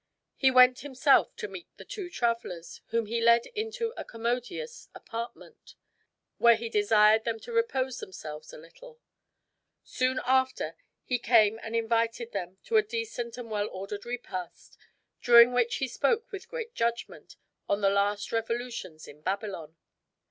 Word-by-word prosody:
He 265 - +4
went 255 0 +6
himself 275 +1 +3
to 445 -2 -5
meet 345 - -9
the - - -11
two 385 -4 -6
travelers, 230 - -3
whom 230 0 0
he 230 +2 -2
led 235 0 +5
into 450 +2 -3
a - - -5
commodious 245 - -4
apartment, 230 +1 -8 0.6
where 235 -1 +7
he 230 +1 -5
desired 210 +1 +4
them 225 -1 -2
to - - -9
repose 265 - 0
themselves 155 -4 -8
a - - -10
little. 465 - -15 0.8
Soon 255 0 0
after 260 0 +1 0.3
he 250 -1 -1
came 225 -2 +4
and 225 0 -5
invited 230 +1 0
them 185 -2 -5
to 455 - +2
a - - +7
decent 425 - -5
and 235 -3 -8
well 210 0 -1
ordered 195 +2 -6
repast 235 -7 -7 0.5
during 235 0 +8
which 240 -1 +2
he 265 - -1
spoke 455 - 0
with 395 - -8
great 475 -1 -6
judgment 235 0 -3 0.3
of 200 - +2
the 195 - +4
last 200 +1 0
revolutions 225 -7 -4
in 150 +1 -14
Babylon. 185 -4 -4
235 Hz, 150 wpm, -28 LUFS, 210-260 Hz, 0.8 s, during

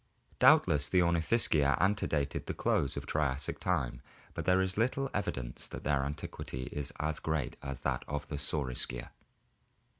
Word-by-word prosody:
Doubtless 75 0 +5
the 90 +3 +4
Ornithischia 80 - +3
antedated 80 -7 0
the - - -3
close 70 - +1
of - - -4
Triassic 70 -2 -1
time, - - -1 0.3
but - - -4
there 90 0 +4
is 95 0 0
little 130 +4 0
evidence 65 -11 -3
that - - -7
their 70 -1 +2
antiquity 70 -2 -5
is 75 0 -3
as 75 +1 -1
great 80 -4 -1
as 70 -3 -5
that - - -1
of 75 0 -3
the 75 - -4
Saurischia. 65 -4 -2
75 Hz, 150 wpm, -32 LUFS, 70-85 Hz, 0.3 s, Doubtless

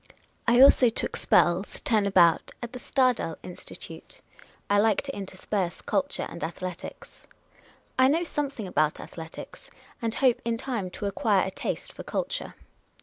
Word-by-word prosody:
I 240 +1 +5
also 260 -2 +8
took 225 - -3
spells, 175 +3 +2
turn 215 -3 +2
about, 175 -4 +4
at 240 +1 -6
the 250 - -6
SiaJel 250 - +1
Institute. 180 - -9 0.5
I 205 0 +3
like 215 -1 +3
to 275 -1 -5
intersperse 190 -1 -3
culture 285 0 -1
and 170 - -8
athletics. 180 +1 -7 0.8
I 260 - +7
know 320 +5 +2
something 285 - -3
about 155 -4 +1
athletics, 165 -1 -9 0.3
and 230 0 -1
hope 255 -4 +3
in 230 0 -1
time 225 -7 -3
to 195 - -6
acquire 200 0 +2
a 190 - -3
taste - - -4
for - - -8
culture. - - -3
210 Hz, 145 wpm, -27 LUFS, 185-255 Hz, 0.8 s, also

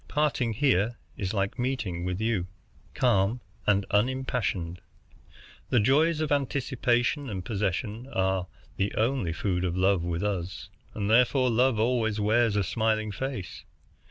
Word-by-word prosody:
Parting 140 -6 0
here 120 -3 +2 0.2
is 95 -2 -3
like 100 +3 -2
meeting 120 -9 -2
with 90 +1 -2
you, 110 -5 0 0.5
calm 115 -1 +2 0.3
and 100 -1 +3
unimpassioned. 105 -7 0 0.9
The 120 - +4
joys 150 +8 +3
of 155 - -1
anticipation 130 -1 0
and 95 -4 -5
possession 105 +3 -2
are 95 -1 0 0.3
the 100 +1 -1
only 115 -6 +1
food 90 +1 -1
of 90 -1 -1
love 95 -1 +3
with 85 +1 -2
us, 90 -3 -3 0.3
and 100 -2 -2
therefore 125 +3 +4
Love 125 +1 +3
always 110 -2 +1
wears 110 +1 +2
a 100 - +2
smiling 110 +1 0
face. 110 -4 -5
110 Hz, 135 wpm, -27 LUFS, 95-125 Hz, 0.9 s, The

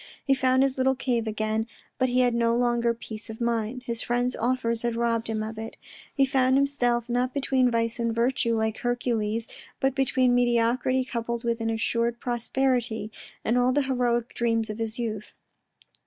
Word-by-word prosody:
He 275 - +4
found 260 0 +3
his 270 -1 0
little 265 +1 +3
cave 240 -3 -1
again, 215 +1 -1 0.3
but 255 -1 +2
he 250 +1 +3
had 245 -1 +3
no 235 0 +2
longer 240 -1 +2
peace 225 -1 -8
of 220 - -7
mind. 235 +1 -1
His 235 -1 -3
friend's 245 +1 0
offers 235 -1 0
had 235 -1 -1
robbed 230 -1 0
him 220 -1 -2
of 220 0 -6
it. 225 0 -7 0.3
He 275 - +3
found 260 -1 +2
himself, 245 -4 +1
not 250 +2 -1
between 265 -2 +2
^ice 230 0 0
and 230 -1 0
virtue, 235 0 +1
like 220 0 -1
Hercules, 230 -2 -1 0.3
but 270 0 +1
between 260 -2 +2
mediocrity 245 +2 +2
coupled 235 -1 -3
with 235 -1 -1
an 225 - 0
assured 230 +1 0
prosperity, 240 -2 -1 0.3
and 235 +3 +2
all 250 +1 +3
the 285 +2 +2
heroic 245 -3 0
dreams 230 -2 0
of 215 - -8
his 225 0 -3
youth. 215 -3 -4
235 Hz, 180 wpm, -26 LUFS, 230-255 Hz, 0.3 s, He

